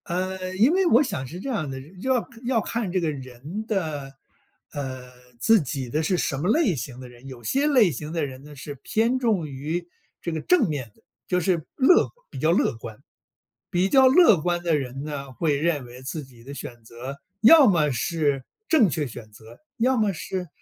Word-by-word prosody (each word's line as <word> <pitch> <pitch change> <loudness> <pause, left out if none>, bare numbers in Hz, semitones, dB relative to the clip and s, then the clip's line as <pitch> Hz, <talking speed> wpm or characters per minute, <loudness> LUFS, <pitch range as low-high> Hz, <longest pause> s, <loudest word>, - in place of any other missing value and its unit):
呃， 185 +1 -3
因 225 +9 +4
为 380 +1 +3
我 265 -3 +5
想 175 - -4
是 170 +7 -8
这 275 - -5
样 175 - -2
的， 135 0 -5 0.2
要 255 +2 0 0.2
要 245 -2 +2
看 220 -2 -3
这 185 - +1
个 165 -3 0
人 140 - -7
的 155 -10 -2 0.6
呃， 130 -3 -6 0.3
自 225 - +5
己 135 -2 -4
的 155 +6 0
是 180 +3 +1
什 140 - -1
么 170 +8 -1
类 275 - +3
型 125 0 -6
的 130 - -9
人。 125 +2 -14
有 130 -3 -10
些 275 - +1
类 245 - +5
型 150 +3 -6
的 165 -3 -1
人 130 -1 -9
呢， 150 0 -12
是 145 +2 -7
偏 230 +4 +1
重 215 -10 +1
于， 155 +5 -4 0.3
这 170 - -4
个 160 -1 -3
正 345 - +3
面 135 -8 -4
的， - - -29 0.2
就 180 - +1
是 175 -3 0
乐 285 +7 +5 0.2
比 - - -7
较 160 - +3
乐 175 - +2
观。 110 -1 -9 0.7
比 180 +2 +2
较 265 +2 +6
乐 260 - +6
观 175 +1 -1
的 170 -2 +2
人 135 0 -5
呢， 140 -3 -6
会 150 +2 0
认 150 -3 0
为 125 +1 -12
自 150 +3 -5
己 125 -3 -17
的 140 +3 -9
选 120 -4 -9
择 120 +5 -8 0.2
要 280 +5 +8
么 155 -7 +3
是 140 +2 0 0.3
正 285 - +5
确 150 +1 -1
选 110 -2 -10
择， 110 +2 -15 0.2
要 255 +3 +2
么 215 -3 +2
是 185 +1 -4
160 Hz, 220 characters per minute, -24 LUFS, 135-210 Hz, 0.7 s, 要